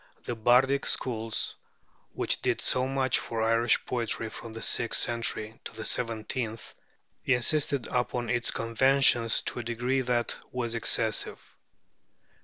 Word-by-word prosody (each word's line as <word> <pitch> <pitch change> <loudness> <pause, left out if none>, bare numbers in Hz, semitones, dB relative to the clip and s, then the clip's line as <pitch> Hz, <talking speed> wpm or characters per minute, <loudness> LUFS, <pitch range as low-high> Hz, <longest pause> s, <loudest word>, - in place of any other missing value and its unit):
The 120 - -3
bardic 125 +5 +3
schools, 115 -3 -1 0.6
which - - -1
did - - 0
so 130 0 0
much 135 -1 +1
for 115 -1 -3
Irish 115 0 +2
poetry 115 -2 -2
from 115 +1 -9
the 115 +1 -8
sixth 120 - +3
century 115 -2 -1
to - - -7
the 110 - -6
seventeenth, 115 0 -3 0.5
insisted 140 +1 +1
upon 125 -1 -2
its 120 +1 0
conventions 120 0 +3
to - - -4
a - - -4
degree 120 +3 -1
that 120 -2 -1
was 120 -2 -2
excessive. 115 - 0
120 Hz, 130 wpm, -28 LUFS, 115-125 Hz, 0.6 s, bardic